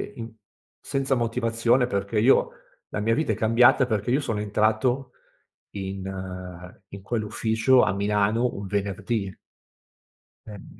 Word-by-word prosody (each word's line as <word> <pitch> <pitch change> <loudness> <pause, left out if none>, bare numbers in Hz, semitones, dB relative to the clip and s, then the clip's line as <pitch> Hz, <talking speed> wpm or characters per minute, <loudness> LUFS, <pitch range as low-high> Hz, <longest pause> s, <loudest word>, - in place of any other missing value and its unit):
i 115 -1 -8 0.5
senza 135 -1 -1
motivazione 115 +1 +1
perché 100 0 -2
io 125 +5 +4 0.4
la - - -4
mia 115 +2 +1
vita 125 -2 0
è - - -4
cambiata 120 +4 +4
perché 110 -1 -2
io 140 - +2
sono 115 -7 -3
entrato 110 +5 0 0.6
in 95 -1 -6 0.8
in 100 - -10
quell'ufficio 110 +4 +1
a - - +2
Milano, 105 +4 +1
un 100 0 -6
venerdì. 100 +1 -2 1.2
Eh 105 -3 -12
110 Hz, 120 wpm, -25 LUFS, 100-120 Hz, 1.2 s, io